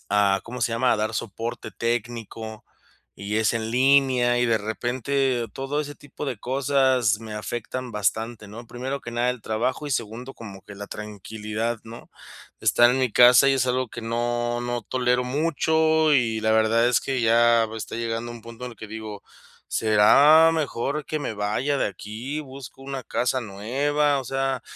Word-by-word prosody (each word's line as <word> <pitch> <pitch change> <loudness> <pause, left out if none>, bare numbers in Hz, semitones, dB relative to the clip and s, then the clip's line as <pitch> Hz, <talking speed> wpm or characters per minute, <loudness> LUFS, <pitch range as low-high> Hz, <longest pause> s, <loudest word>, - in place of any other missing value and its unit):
a, 100 -1 +3
¿cómo 125 +2 -7
se 115 - +1
llama?, 125 +2 +2
a - - +1
dar 110 +1 -2
soporte 115 +3 -5
técnico, 115 -1 -4 0.5
y 100 +2 -4
es 110 +1 +2
en 110 -1 -2
línea, 130 -1 +3
y 125 - +2
de 115 -2 +2
repente 120 +3 -1
todo 135 +3 -2
ese 145 -1 -6
tipo 145 +1 -9
de 125 -5 -3
cosas 130 -3 +2
me 110 -1 -9
afectan 120 +3 -5
bastante, 110 +1 -2
¿no? 115 +4 -10
Primero 130 +4 -5
que 120 - -8
nada, 120 +1 +1
el 125 -2 -6
trabajo 115 +8 -2
y 145 - -5
segundo, 120 +2 -4
como 100 -4 -10
que 105 - -12
la 100 +1 -8
tranquilidad, 105 +2 -5
¿no? 115 +1 -11 0.5
Estar 120 0 +5
en 130 - 0
mi 130 -2 +1
casa 125 +4 +7
y 135 - +4
es 130 -1 +1
algo 130 0 0
que 120 - -8
no 120 +1 -1
no 120 0 -3
tolero 125 +1 0
mucho 160 +2 +2
y 115 -5 +2
la 110 0 +2
verdad 110 +2 +3
es 125 - +3
que 135 -2 -2
ya 115 0 +4
está 110 0 -6
llegando 115 0 -3
un 120 -1 -11
punto 115 +2 -9
en 125 - -7
el - - -17
que 110 - -9
digo: 110 -1 -8 0.4
"¿Será 140 +9 +6
mejor 150 -1 -2
que 155 - -2
me 145 - -3
vaya 110 +7 -1
de - - +1
aquí?, 110 +9 -6
busco 135 -3 -11
una 135 -1 -5
casa 125 +2 -1
nueva". 135 +7 0
O - - -8
sea, 135 -1 -2
120 Hz, 180 wpm, -24 LUFS, 110-135 Hz, 0.5 s, casa